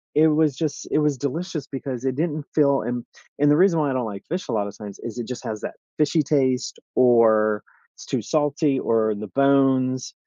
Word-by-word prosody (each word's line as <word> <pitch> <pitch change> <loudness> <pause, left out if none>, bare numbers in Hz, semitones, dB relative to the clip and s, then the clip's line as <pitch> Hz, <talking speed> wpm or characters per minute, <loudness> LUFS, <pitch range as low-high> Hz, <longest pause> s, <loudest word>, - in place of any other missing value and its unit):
it 155 +1 +6
was 150 -2 +2
just 150 0 -3
it - - +2
was 150 -1 +2
delicious, 155 +4 -4
because 135 -2 -5
it 130 -1 0
didn't 155 -1 -2
feel 140 -3 +3
and 120 +1 -3 0.4
and 145 +1 +4
the 150 - +4
reason 180 -2 +4
why 150 -2 +1
I - - -1
don't 130 -2 -1
like 100 -3 -7
fish 180 +3 -3
a - - -1
lotta 100 -2 -1
times 105 -2 -9
is 115 -1 -6
it 115 - -5
just 125 -1 -6
has 105 -1 -4
that - - -6 0.2
fishy 155 +1 +2
taste, 130 -3 0 0.2
or 110 -4 +4 0.3
it's - - -12
too - - -2
salty, 145 -1 +1
or 110 -3 +1
the 105 +1 -6
bones, 135 0 +2
135 Hz, 210 wpm, -23 LUFS, 115-150 Hz, 0.4 s, it